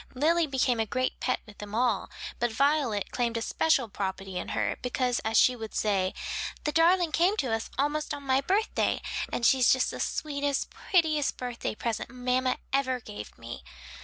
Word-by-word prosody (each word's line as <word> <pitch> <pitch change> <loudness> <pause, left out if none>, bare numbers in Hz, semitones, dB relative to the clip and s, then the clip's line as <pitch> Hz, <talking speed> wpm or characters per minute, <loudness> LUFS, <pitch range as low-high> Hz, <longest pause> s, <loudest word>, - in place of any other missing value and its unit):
Lily 325 +5 +3
became 255 -3 +1
a 220 - +1
great 255 +4 -1
pet 255 - 0
with 210 -2 -15
them 210 0 -6
all, 235 -3 +1 0.3
but 240 0 +1
Violet 275 -5 +1
claimed 235 -2 0
a - - -2
special 275 -4 +2
property 195 -2 -4
in - - -5
her - - 0
because 250 0 0
as 220 0 0
she 255 - +6
would 225 -2 -7
say, 195 -3 +1 0.5
"The 300 - 0
darling 335 +2 +4
came 360 +7 +3
to 255 - 0
us 225 0 -2
almost 295 +2 0
on 285 - -4
my 265 0 +2
birthday 400 +9 +1 0.3
and 235 - -1
she's 260 -2 +5
just 260 - +2
the - - -7
sweetest, 285 -2 -1
prettiest 315 -6 +1
birthday 245 -3 -4
present 230 0 -3
mamma 250 +1 0 0.2
ever 260 -2 +1
gave 105 - -9
me." 115 +1 -8
255 Hz, 180 wpm, -28 LUFS, 225-290 Hz, 0.5 s, she